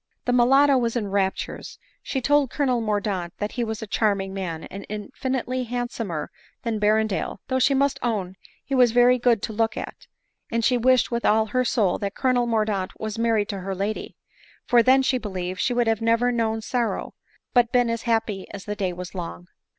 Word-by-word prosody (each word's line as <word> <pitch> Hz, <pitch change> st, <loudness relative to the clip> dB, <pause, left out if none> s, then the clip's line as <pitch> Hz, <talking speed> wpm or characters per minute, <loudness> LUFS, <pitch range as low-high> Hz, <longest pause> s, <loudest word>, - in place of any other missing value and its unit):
The 245 Hz, -, +1 dB
mulatto 270 Hz, +3 st, +5 dB
was 235 Hz, -1 st, -1 dB
in 215 Hz, -4 st, -1 dB
raptures; 195 Hz, -1 st, -2 dB
— -, -, -35 dB
she 265 Hz, -, -3 dB
told 290 Hz, +1 st, +3 dB
Colonel 255 Hz, -4 st, 0 dB
Mor 210 Hz, -2 st, 0 dB
daunt 185 Hz, -4 st, -4 dB
that 205 Hz, 0 st, -3 dB
he 245 Hz, -, -2 dB
was 220 Hz, -1 st, -4 dB
a -, -, -4 dB
charming 200 Hz, -2 st, 0 dB
man, 170 Hz, -5 st, -4 dB
and 200 Hz, +2 st, -8 dB
infinitely 255 Hz, +4 st, -3 dB
hand 245 Hz, 0 st, -3 dB
somer 170 Hz, -10 st, -4 dB, 0.3 s
than 225 Hz, -2 st, -1 dB
Berrendale, 215 Hz, -1 st, +1 dB
though 260 Hz, 0 st, +1 dB
she 275 Hz, +2 st, +3 dB
must 280 Hz, +1 st, +1 dB
own 200 Hz, -6 st, -2 dB, 0.3 s
he 275 Hz, -, -5 dB
was 250 Hz, -3 st, +4 dB
very 245 Hz, +1 st, +5 dB
good 235 Hz, -3 st, +2 dB
to 220 Hz, -, -3 dB
look 225 Hz, +1 st, 0 dB
at; -, -, -7 dB, 0.4 s
and 230 Hz, 0 st, 0 dB
she 255 Hz, -, +3 dB
wished 255 Hz, +1 st, +3 dB
with 235 Hz, 0 st, -1 dB
all 220 Hz, +1 st, +3 dB
her 255 Hz, +4 st, 0 dB
soul 215 Hz, -7 st, +1 dB
that 200 Hz, 0 st, -3 dB
Colonel 250 Hz, -2 st, +1 dB
Mordaunt 215 Hz, -4 st, -1 dB
was 215 Hz, +1 st, -4 dB
married 225 Hz, -3 st, +1 dB
to 200 Hz, -, -3 dB
her 190 Hz, +1 st, -4 dB
lady; 200 Hz, +3 st, -3 dB, 0.5 s
for 240 Hz, -1 st, +5 dB
then 260 Hz, +2 st, +5 dB
she 260 Hz, -1 st, +1 dB
believed 185 Hz, -4 st, -4 dB
she 260 Hz, -, +1 dB
would 240 Hz, -1 st, +2 dB
have 225 Hz, -1 st, +1 dB
never 230 Hz, +2 st, +2 dB
known 225 Hz, -2 st, 0 dB
sorrow, 230 Hz, -2 st, -2 dB, 0.4 s
but 245 Hz, -2 st, +4 dB
been 245 Hz, -1 st, +3 dB
as 230 Hz, 0 st, -2 dB
happy 220 Hz, -4 st, -1 dB
as 200 Hz, -2 st, -9 dB
the 210 Hz, -, -3 dB
day 190 Hz, -3 st, -2 dB
was 180 Hz, 0 st, -8 dB
long. 85 Hz, +1 st, -7 dB
225 Hz, 205 wpm, -24 LUFS, 200-245 Hz, 0.5 s, mulatto